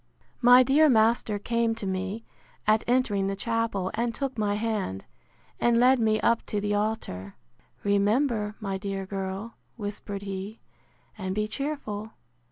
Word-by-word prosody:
My 245 +1 +8
dear 295 +4 +5
master 220 -2 +3
came 230 +2 0
to 220 - -5
me, 190 +4 -3 0.4
at 215 +1 +3
entering 225 -6 +2
the 195 - -1
chapel, 225 -3 -1
and 235 +1 -1
took 275 -2 -3
my 210 -2 0
hand, 210 - -2 0.5
and 235 -1 +3
led 255 +1 +5
me 220 -1 +2
up 235 0 +2
to 210 - -1
the 205 0 -1
altar. 205 - -2 0.5
Remember, 210 +2 +1
my 195 -2 -3
dear 195 -1 -4
girl, 195 +3 -5 0.2
whispered 205 -1 -5
he, 195 +2 -6 0.6
and 190 -1 -3
be 210 0 0
cheerful. 220 -6 -4
215 Hz, 145 wpm, -27 LUFS, 200-235 Hz, 0.6 s, My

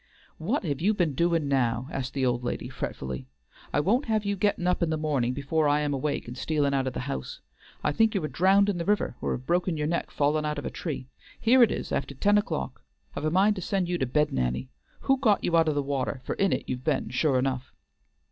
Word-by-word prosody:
"What - - -1
have 145 -5 -2
you 210 +4 +3
been 170 -7 +1
doin' 165 0 +1
now?" 130 -2 +1
asked 135 0 -4
the 135 -1 +1
old 120 -1 0
lady 120 - -3
fretfully. 65 -1 -5 0.4
"I - - +2
won't 225 - +2
have 215 -2 0
you 200 0 0
gettin' 200 -2 0
up 180 0 +1
in 170 - +2
the 160 - 0
mornin' 140 -6 0
before 145 +3 0
I 145 +1 +3
am 145 -1 0
awake 140 0 -2
and 120 - -7
stealin' 145 0 0
out 135 -1 +1
of 130 - -2
the - - -3
house. 135 +2 -5 0.4
I - - +2
think 225 -1 +2
you 190 - 0
are - - 0
drowned 195 +5 +4
in 195 -4 0
the - - -1
river 205 -10 +1
or - - -1
have 130 - -6
broken 175 0 +1
your 150 - -1
neck 170 +2 -1
fallin' 150 +1 +1
out 150 -1 -2
of 145 - -5
a - - -3
tree. 150 -6 -4 0.3
Here 250 +3 +5
it 235 - +7
is - - -4
after 140 - -2
ten 205 +9 +4
o'clock. 155 -9 -4 0.3
I've 145 - -3
a - - +3
mind 195 +5 +3
to - - -3
send 190 0 -1
you 175 0 -1
to 130 - 0
bed, 150 +4 +1
Nanny; 65 0 -1 0.3
who 270 -1 +2
got 215 -6 +3
you 170 - +1
out 165 -1 +4
of 155 - +1
the 145 - +1
water, 135 -1 -2
for - - -3
in 195 -1 +1
it - - 0
you've 125 0 -4
been 145 -2 0
sure 135 +1 +2
enough?" 130 0 -1
150 Hz, 250 wpm, -27 LUFS, 130-185 Hz, 0.4 s, it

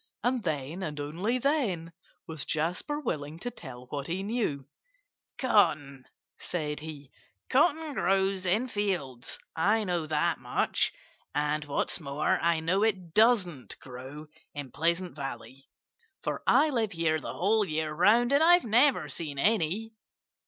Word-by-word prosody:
And 245 +1 +1
then 155 -1 -3
and 150 -5 -4
only 175 +12 -1
then 230 - 0 0.3
was 160 -3 -2
Jasper 180 - -2
willing 150 - -4
to 245 +8 -5
tell 125 - -10
what 140 +2 -5
he 185 +3 -2
knew. 200 - -2 0.7
"Cotton 145 - +2 0.2
" - - -48
said 150 -4 -3
he 150 -3 -9 0.4
"cotton 305 +2 +2
grows 190 -3 +1
in 215 +8 +2
fields. 180 - -3 0.2
I 210 +7 +2
know 175 -5 -1
that 155 +2 +1
much. - - 0 0.4
And 150 0 0
what's 145 - -1
more, 145 -1 0
I 170 -1 +2
know 180 +5 +1
it 190 -7 0
doesn't 205 - +2
grow 130 +4 -9 0.3
in 145 -3 -6
Pleasant 170 +3 0
Valley, 135 -2 -7 0.5
for - - -2
I 300 +2 +5
live 225 -6 0
here 165 -2 +1
the - - -6
whole 210 +4 +2
year 155 -4 -2
round 220 - +4
and 285 - +5
I've 350 -1 +6
never 245 +5 +4
seen 150 -5 -4
any." 210 +5 +1
170 Hz, 145 wpm, -29 LUFS, 150-220 Hz, 0.7 s, I've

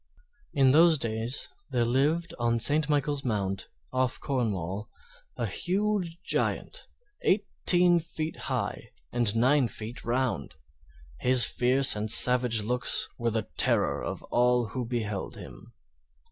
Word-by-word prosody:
In 135 -2 +4
those 160 +2 +5
days 115 +1 -3 0.2
there 125 -3 0
lived 155 +7 0
on 115 0 +1
St. 150 +5 +3
Michael's 145 -1 0
Mount, 100 -5 -2 0.3
off 130 -1 -1
Cornwall, 105 -6 -3 0.5
a - - -2
huge 190 -2 -2
Giant, - - -2 0.3
eighteen 180 -3 +3
feet 160 -1 -5
high - - -3 0.2
and 120 -3 0
nine 130 +3 +3
feet 115 +2 -8
round; 125 +1 -2 0.6
his 125 -1 +6
fierce 130 +2 +2
and 105 +1 -3
savage 120 -1 +4
looks 125 +3 0
were 120 0 0
the 110 -1 -3
terror - - +2
of - - -5
all 125 -2 +2
who 125 +2 -4
beheld 110 -5 -4
him. - - -12
125 Hz, 125 wpm, -27 LUFS, 115-150 Hz, 0.6 s, his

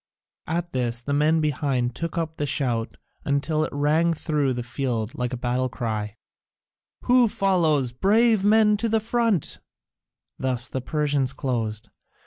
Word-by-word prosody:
At 175 +1 -2
this 120 -2 0
the 140 +4 -3
men 155 +3 +3
behind 135 -4 0
took 165 +5 -4
up 160 -1 -3
the 145 - -2
shout 120 -6 -2 0.4
till 155 +1 0
it - - -3
rang 155 +4 +2
through 150 -4 0
the 120 0 -4
field 120 -2 -3
like 125 -4 -3
a 125 - -3
battle 125 +1 -1
cry: 110 -3 -4 0.9
"Who 245 -1 +5
follows? 165 - +1
Brave 215 - +3
men 210 0 +4
to 230 +2 -1
the 225 0 +2
front!" 225 - 0 0.8
Thus 125 -2 0
the 130 - -4
Persians 145 -1 0
closed. 115 -5 -3
145 Hz, 145 wpm, -24 LUFS, 125-170 Hz, 0.9 s, Who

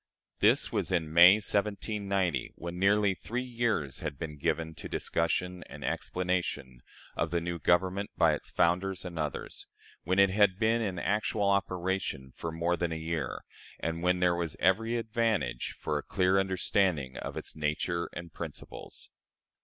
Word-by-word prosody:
This - - +4
was - - 0
in 80 -4 0
May, 85 +3 +9
1790, 100 - -1
when 85 +1 -6
nearly 100 +1 +4
three 120 +6 -4
years 115 - -1
had 75 -3 -4
been 75 -1 -6
given 80 +2 -1
to - - -8
discussion 90 +2 -1
and - - -8
explanation 90 -9 -2 0.3
of 80 - 0
the 85 +1 0
new 85 0 -4
Government 95 +4 +2
by 80 -3 +5
its 75 - -4
founders 95 +2 +1
and 85 -2 -5
others, 75 -2 -4 0.4
when 95 +3 0
it 100 -1 +6
had 100 -2 +4
been 115 +2 +2
in 95 -5 -2
actual 105 +2 0
operation 95 -8 -1
for 85 - -4
more 85 +2 0
than 85 -1 -2
a - - -2
year, 80 -4 -3 0.4
and 80 +1 -2
when 90 +1 +2
there 90 -1 +4
was 85 -3 -3
every 115 +5 +2
advantage 110 - -1
for 75 -1 -1
a - - -4
clear 95 0 +2
understanding 95 -7 +1
of - - -5
its - - -5
nature 80 +3 -1
and 85 -2 -8
principles. - - -7
90 Hz, 160 wpm, -30 LUFS, 80-100 Hz, 0.4 s, May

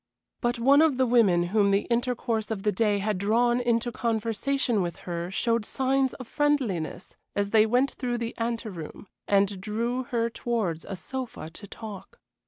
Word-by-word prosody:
But 240 0 0
one 275 +5 +5
of 315 -5 +3
the 260 - +3
women 220 -8 +4
whom 205 -2 +4
the 200 +1 +2
intercourse 235 -2 0
of 210 -3 -3
the 210 - +2
day 205 0 +2
had 200 -1 -1
drawn 240 +4 +2
into 240 0 +1
conversation 230 +1 0
with 175 -2 -2
her 175 0 -3
showed 230 +4 0
signs 265 +3 0
of 255 - -9
friendliness 245 - -1 0.2
as 200 0 0
they 220 -1 +5
went 250 +5 +2
through 245 -2 -3
the 230 0 -3
anteroom, 225 -8 -4 0.2
and 200 -1 +2
drew 235 +5 -2
her 230 -1 0
towards 225 -8 -2
a 195 - -5
sofa 240 -4 -6
to 205 +5 -10
talk. 210 -2 -9
230 Hz, 170 wpm, -27 LUFS, 200-245 Hz, 0.2 s, one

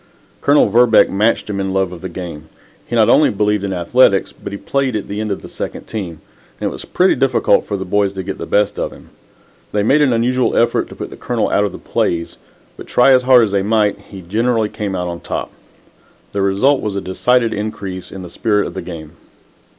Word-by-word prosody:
Colonel 145 +1 +4
Verbeck 115 +2 +4
matched 105 +4 +1
him 100 -2 -3
in 95 -1 -2
love 95 -2 +1
of 90 - -9
the 95 - -5
game. 85 -3 -8 0.4
He 120 - -3
not 110 -2 +4
only 150 - +5
believed 105 -1 0
in 100 - -2
athletics, 95 +3 +3
but - - -9
he 100 - -5
played 135 +2 -1
at 105 - -3
end 105 +1 -3
on 100 - -1
the - - -11
second - - -6
team, 85 -7 -6 0.4
and - - -1
it - - -7
was - - -9
pretty 185 +1 +2
difficult 135 -2 +2
for 100 - -2
the 95 - -5
boys 100 +1 +1
to 95 -1 -5
get 95 +1 -6
the - - -5
best 105 0 +1
of - - -2
him. - - -16 0.6
They 105 - 0
made 140 +8 +3
an 140 -3 +3
unusual 125 +2 +1
effort 120 - +2
to - - -11
put - - -7
the - - -10
Colonel 120 -3 -1
out 105 - +2
of 100 - -3
the - - -8
plays, 85 -1 -2 0.4
but, - - -10
try 125 +2 +4
as 130 -1 +6
hard 125 -1 +6
as 105 - 0
they 100 -1 +1
might, 105 0 +1
he 95 -2 -12
generally 110 +4 0
came 100 -3 -4
out 90 -1 -2
on 85 -1 -5
top. - - -5 0.8
The 100 - -1
result 100 +9 +2
was 105 -2 -3
a 100 - -2
decided 115 +6 +1
increase 105 -3 -5
in 95 -1 -8
the 90 - -9
spirit 105 -1 0
of - - -6
the 95 - -5
game. 80 -4 -8
105 Hz, 230 wpm, -17 LUFS, 95-115 Hz, 0.8 s, as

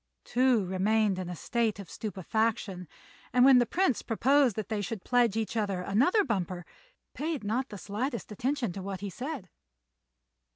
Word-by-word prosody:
Tou 250 -3 +3
remained 195 +2 +1
in 180 -1 -4
a 180 - -4
state 230 +4 -1
of 200 -3 -8
stupefaction, 205 -1 -2 0.5
and, 250 0 +6
when 265 -2 +8
the 240 - +2
Prince 365 - +1
proposed 260 +1 +3
that 215 - -4
they 215 -2 -2
should 205 0 -5
pledge 240 -4 +2
each 225 +1 -2
other 200 -4 -1
in - - -7
another 275 - +4
bumper, 185 - -2 0.5
paid 305 -5 -3
not 240 +6 -1
the 205 - -7
slightest 220 +5 -4
attention 245 -1 -1
to 195 - -6
what 195 0 -5
he 200 -1 -4
said. 260 - -5
220 Hz, 170 wpm, -29 LUFS, 195-250 Hz, 0.5 s, when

